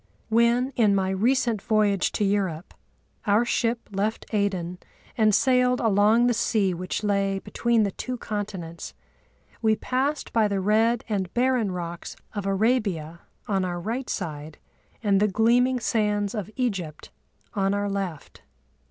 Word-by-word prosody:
When, 235 Hz, +4 st, +3 dB
in 210 Hz, -4 st, +4 dB
my 190 Hz, -1 st, +1 dB
recent 230 Hz, +1 st, +1 dB
voyage 215 Hz, -4 st, +2 dB
to -, -, 0 dB
Europe, 195 Hz, -4 st, -1 dB, 0.5 s
our 210 Hz, +4 st, +4 dB
ship 235 Hz, 0 st, -1 dB
left 205 Hz, +3 st, -2 dB
Aden 185 Hz, -4 st, -1 dB, 0.4 s
and 215 Hz, -3 st, +4 dB
sailed 250 Hz, +1 st, +3 dB
along 215 Hz, +2 st, +4 dB
the 245 Hz, -, +3 dB
sea 215 Hz, -4 st, +1 dB
which 180 Hz, +4 st, -4 dB
lay 200 Hz, -1 st, +1 dB
between 235 Hz, +3 st, +1 dB
the 200 Hz, -, 0 dB
two 255 Hz, +6 st, -5 dB
continents, 195 Hz, -7 st, -6 dB, 0.7 s
we 220 Hz, -1 st, +3 dB
passed 270 Hz, +6 st, -2 dB
by 225 Hz, -2 st, +3 dB
the 200 Hz, -1 st, -1 dB
red 220 Hz, +4 st, +2 dB
and 195 Hz, -5 st, -2 dB
barren 245 Hz, -4 st, +2 dB
rocks 170 Hz, -1 st, -6 dB, 0.2 s
of 205 Hz, -2 st, -3 dB
Arabia 195 Hz, -6 st, 0 dB, 0.3 s
on 195 Hz, -3 st, 0 dB
our 175 Hz, -1 st, -3 dB
right 235 Hz, +8 st, -4 dB
side 150 Hz, -1 st, -5 dB, 0.5 s
and 200 Hz, -2 st, +3 dB
the 210 Hz, -, +3 dB
gleaming 240 Hz, +5 st, +3 dB
sands 210 Hz, -2 st, 0 dB
of 210 Hz, -4 st, -4 dB
Egypt 190 Hz, -, -3 dB, 0.4 s
on 195 Hz, -1 st, +1 dB
our 205 Hz, 0 st, -1 dB
left. 195 Hz, -6 st, -5 dB
210 Hz, 145 wpm, -25 LUFS, 195-235 Hz, 0.7 s, in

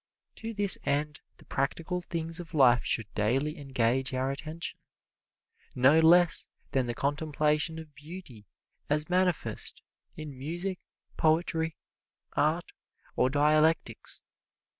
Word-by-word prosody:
To 225 Hz, 0 st, -6 dB
this 205 Hz, -3 st, +8 dB
end 150 Hz, +2 st, -1 dB, 0.2 s
the -, -, -19 dB
practical 165 Hz, +6 st, -3 dB
things 165 Hz, -1 st, -2 dB
of 170 Hz, -2 st, -9 dB
life 125 Hz, -4 st, +4 dB
should 105 Hz, -3 st, 0 dB
daily 135 Hz, +9 st, -1 dB
engage 130 Hz, -1 st, -1 dB
our 130 Hz, +1 st, -1 dB
attention, 155 Hz, +4 st, -6 dB, 1.0 s
no 135 Hz, +5 st, +4 dB
less 170 Hz, +1 st, +5 dB, 0.2 s
than 130 Hz, -3 st, 0 dB
the 120 Hz, -, -3 dB
contemplation 150 Hz, +3 st, -1 dB
of 160 Hz, -2 st, -11 dB
beauty 150 Hz, -, -12 dB, 0.4 s
as 150 Hz, +3 st, 0 dB
manifest 180 Hz, -2 st, 0 dB, 0.3 s
in 155 Hz, -3 st, -9 dB
music, 175 Hz, +8 st, -4 dB, 0.4 s
poetry, 160 Hz, 0 st, 0 dB, 0.6 s
art 155 Hz, +4 st, 0 dB, 0.4 s
or 125 Hz, -, +2 dB
dialectics. 155 Hz, +3 st, +1 dB
150 Hz, 115 wpm, -28 LUFS, 135-165 Hz, 1.0 s, this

